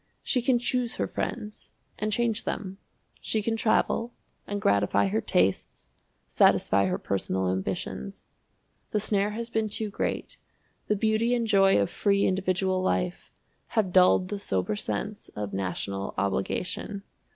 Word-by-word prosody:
She 255 - +1
can 245 +1 +3
choose 245 0 -1
her - - 0
friends 215 -3 -5 0.3
and 215 0 -1
change 230 0 +1
them. 195 -1 -4 0.4
She 215 -1 -1
can 225 +1 0
travel, 230 +1 +1 0.3
and 205 0 -2
gratify 100 - +2
her 110 +3 0
tastes, 95 -1 0 0.3
satisfy 100 0 +3
her 90 0 0
personal 95 -1 -1
ambitions. 65 -8 -4 0.6
The 210 - 0
snare 205 -1 +1
has 235 0 -4
been 220 -1 0
too 210 0 -2
great; - - -3 0.5
the 210 - +2
beauty 220 +3 +2
and 235 -1 0
joy 195 -3 +5
of 100 - +2
free 200 -1 +1
individual 185 0 +1
life 180 -1 -1 0.5
have 190 -5 +2
dulled 185 0 +5
the 205 - -3
sober 95 - -1
sense 110 - -4
of 105 -1 -4
national 95 +1 -3
obligation. 180 - -2
195 Hz, 140 wpm, -27 LUFS, -, 0.6 s, joy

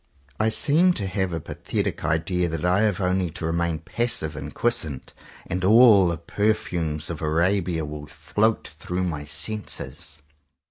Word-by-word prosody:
I 110 - +3
seem 165 +10 +3
to 105 - -3
have 95 -1 -1
a 85 - -2
pathetic - - -3
idea 85 +3 0
that 80 +1 -3
I 90 +2 +3
have 105 -4 +1
only 90 -1 0
to 80 0 -6
remain 85 0 0
passive 80 -2 -1
and 75 0 -6
quiescent, 80 - 0 0.3
and 90 +1 -3
all 105 -2 +7
the 85 -1 -1
perfumes 85 -4 -1
of 80 - -6
Arabia 85 +1 +1
will 75 0 -7
float 110 +1 0
through 90 +2 -3
my 75 -5 -3
senses. 80 -3 -6
90 Hz, 150 wpm, -24 LUFS, 80-105 Hz, 0.3 s, all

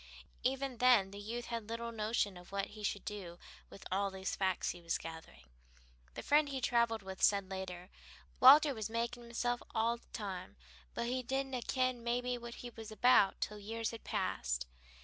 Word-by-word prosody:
Even 265 0 0
then 240 -7 +5
the 200 - -8
youth 230 +4 -4
had 230 -2 -5
little 230 0 -3
notion 215 -2 0
of 180 +1 -13
what 195 0 -2
he 215 - -9
should 200 -1 -2
do 185 -5 -6 0.3
with 195 - -12
all 200 +1 +1
the 190 0 -9
facts 190 -1 0
he 175 - -10
was 170 0 0
gathering. 160 - -10 0.7
The - - -5
friend 295 0 +4
he 270 -1 -2
traveled 235 -3 +2
with 190 0 -8
said 200 -2 +3
later, 185 -1 -6 0.5
"Walter 285 +3 +9
was 220 -3 -4
makin' 235 +1 -2
himself 240 +1 -2
a' 230 +2 +2
the - - -26
time, 190 -4 -5 0.4
but - - -1
he 255 +2 -1
didna 265 0 -2
ken 255 -1 0
maybe 245 +1 0
what 235 -1 -7
he 240 - -6
was 225 -1 -9
about 215 -2 +5
till 210 0 -2
years 225 +2 -3
had 230 - -9
passed. - - -1
225 Hz, 185 wpm, -35 LUFS, 195-245 Hz, 0.7 s, Walter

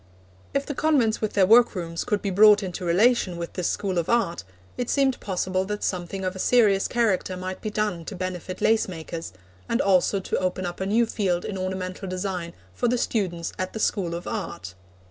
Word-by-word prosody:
If 275 0 +1
the 290 - -4
convents 265 -7 +2
with 215 - -1
their 195 -2 +4
workrooms 185 -7 +3
could 210 -1 -1
be 200 - -1
brought 210 +2 +6
into 185 0 -5
relation 190 +1 +3
with 170 0 -5
this 180 -2 -1
School 190 -3 -1
of 165 - -3
Art, 230 - +1 0.3
it 245 -1 -3
seemed 270 -2 +2
possible 185 -1 -1
that 210 +1 -4
something 185 +1 -3
of 185 0 -2
a - - -7
serious 205 -4 +4
character 205 -6 0
might 185 +1 -5
be 215 - -3
done 210 -5 -1
to - - -6
benefit 185 0 -5
lace 225 0 +3
makers, 165 -2 -6 0.4
and 230 - +1
also 195 +1 +3
to 190 - -2
open 185 0 -1
up 175 0 -5
a 190 - -1
new 230 +4 +3
field 185 -6 -1
in 205 - -4
ornamental 185 0 -4
design 180 -2 -3 0.2
for 245 - 0
the 245 +1 +2
students 180 -8 -2
at 185 0 -3
the 220 - -5
School 180 -6 0
of 170 - -6
Art. 95 +1 -5
190 Hz, 205 wpm, -25 LUFS, 180-215 Hz, 0.4 s, brought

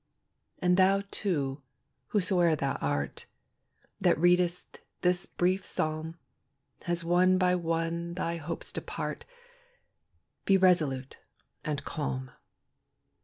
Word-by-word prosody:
And 180 0 +2
thou, 195 +1 +4
too, 145 -8 -1 0.5
whosoe'er 180 -5 +3
thou 140 -2 -1
art, 70 0 -2 0.7
That - - +3
readest 175 +1 +2 0.2
this 180 0 +1
brief 185 +2 0
psalm, 155 +1 -3 0.7
As 170 -1 +1
one 180 +2 +4
by 180 -1 +3
one 170 0 -1
thy 170 -2 -2
hopes 165 +1 -5
depart, - - -4 1.2
Be 195 - +4
resolute 155 -8 +2 0.4
and 150 -2 -3
calm. 130 -5 -3
170 Hz, 100 wpm, -29 LUFS, 155-180 Hz, 1.2 s, thou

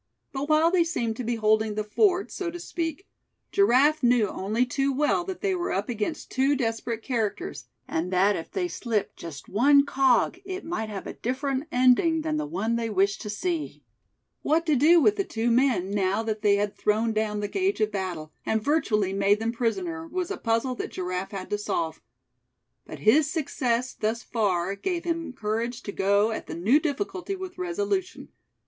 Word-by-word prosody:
But 280 +2 -3
while 310 +2 +4
they 360 -2 +4
seemed 240 -10 -2
to 250 - -3
be 235 +1 -1
holding 215 -1 +2
the 215 - -1
fort, 370 - +2
so 370 -3 -3
to 350 +1 -7
speak, 335 0 -4 0.4
Giraffe 305 -4 +4
knew 240 -4 +4
only 215 +6 0
too 275 +2 0
well 295 +5 +1
that 380 0 -6
they 395 -2 +1
were 355 -1 -2
up 200 +4 -2
against 240 +7 -3
two 270 +2 +2
desperate 230 -2 -2
characters, 245 - -3 0.2
and 170 +3 -2
that 195 +3 +3
if 165 - -6
they 365 -2 -2
slipped 230 - -2
just 150 -4 -9
one 280 +7 +5
cog, 270 +5 +2
it 380 0 -6
might 320 -10 -3
have 200 -2 -6
a - - -5
different 270 +3 -2
ending 255 +6 +4
than 310 -1 -1
the 305 0 -2
one 235 -7 -1
they 230 -1 -2
wished 200 -1 +1
to 210 - -6
see. 320 - -3 0.6
What 320 +3 +1
to 310 -3 +3
do 320 +6 +6
with 415 +6 +3
the 395 - +1
two 235 -7 -1
men, 235 -7 +2
now 200 +1 +1
that 220 -1 -3
they 205 -1 +4
had 205 0 -1
thrown 220 +2 +1
down 215 -1 -1
the 205 - -2
gage 390 - 0
of 215 -1 +1
battle, 180 -6 -4
and 220 - +1
virtually 215 -7 +1
made 200 +1 +3
them 225 +1 -1
prisoner, 325 +8 -2
was 360 +2 -3
a - - -3
puzzle 230 +3 0
that - - -4
Giraffe 185 +1 -4
had 195 -2 -7
to 205 - 0
solve. 165 -5 -2 0.9
But - - -8
his 290 +7 +4
success 255 -6 -1
thus 225 +2 -2
far 195 -5 0
gave 340 - -3
him 330 -3 -2
courage 230 +1 -3
to 200 - -5
go 200 +3 +2
at 220 - -5
the - - -5
new 220 - +4
difficulty 360 +5 -3
with 370 -1 -8
resolution. 375 +1 -2
245 Hz, 190 wpm, -26 LUFS, 210-320 Hz, 0.9 s, do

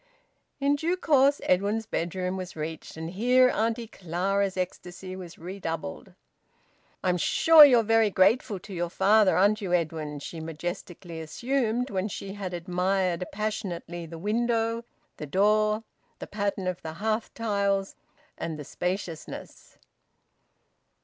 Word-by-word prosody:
In 280 +1 +2
due 335 +5 0
course 285 -4 +4
Edwin's 205 +4 +1
bedroom 180 -1 -2
was 185 -1 -6
reached, 160 +1 -6
and 160 +1 -5
here 250 +6 +4
Auntie 230 +1 -1
Clara's 195 0 -1
ecstasy 185 0 -5
was 180 -3 -9
redoubled. 165 - -6 0.9
"I'm 180 -1 +2
sure 320 - +7
you're 250 -5 +7
very 225 0 +4
grateful 200 +3 +3
to 200 - -10
your 175 -1 -2
father, 200 +2 +4
aren't 205 +3 +3
you, 185 -3 -2
Edwin?" 155 -3 -1
she 160 +3 -7
majestically 165 +1 -6
assumed, 240 - -1
when 190 0 -1
she 195 -1 -6
had 195 -3 -5
admired 180 0 0
passionately 190 -5 -4
the 165 +1 -8
window, 230 +4 0 0.3
the 150 - -6
door, 215 +5 +2 0.3
the - - -7
pattern 200 -2 -2
of 185 -1 -2
the 160 -1 -6
hearth 215 +5 -2
tiles, 200 -3 0 0.5
and 160 -2 -4
the 150 - -7
spaciousness. 180 0 -5
195 Hz, 130 wpm, -27 LUFS, 175-220 Hz, 0.9 s, sure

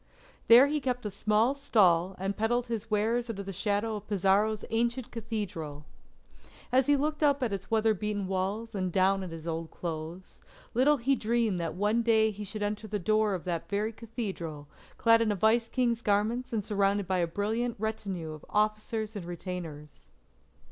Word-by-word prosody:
There 240 +4 +9
he 295 +1 -1
kept 250 -3 -2
a 210 - -2
small 215 +5 +2
stall 190 -9 +3
and 195 +2 -2
peddled 235 +3 0
his 230 -2 -4
wares 225 +3 +1
under 200 -3 -4
the 195 0 -6
shadow 210 +3 0
of 210 - -11
Pizarro's 205 +2 +2
ancient 235 +2 0
Cathedral. 200 -10 -5 0.9
As 260 +1 +3
he 290 - +5
looked 300 +2 -1
up 285 -2 +3
at 225 -5 0
its 195 -1 -5
weather 220 0 +3
beaten 210 0 -3
walls 195 +5 -2
and 185 -3 -2
down 195 +2 +3
at 185 - -5
his 165 -1 -8
old 165 -1 -3
clothes, 165 +2 -7 0.3
little 280 +5 +4
he 270 +2 +2
dreamed 225 -4 0
that 165 -1 -3
one 210 +5 +1
day 220 -1 +3
he 210 0 -7
should 205 +1 -4
enter 210 +1 -3
the 210 0 -2
door 215 +1 +2
of 180 - -6
that 175 -3 -3
very 210 +2 -1
Cathedral 195 - -6 0.3
clad 230 0 +5
in 220 -2 +2
a - - 0
Vice 225 +3 +2
King's 240 -2 0
garments 225 +4 0
and 220 -3 -1
surrounded 200 -1 +1
by 185 0 0
a 170 - +1
brilliant 220 +7 -1
retinue 200 -6 -3
of 155 -1 -10
officers 215 +1 -1
and 195 -4 -5
retainers. 165 - -7
210 Hz, 180 wpm, -29 LUFS, 190-230 Hz, 0.9 s, There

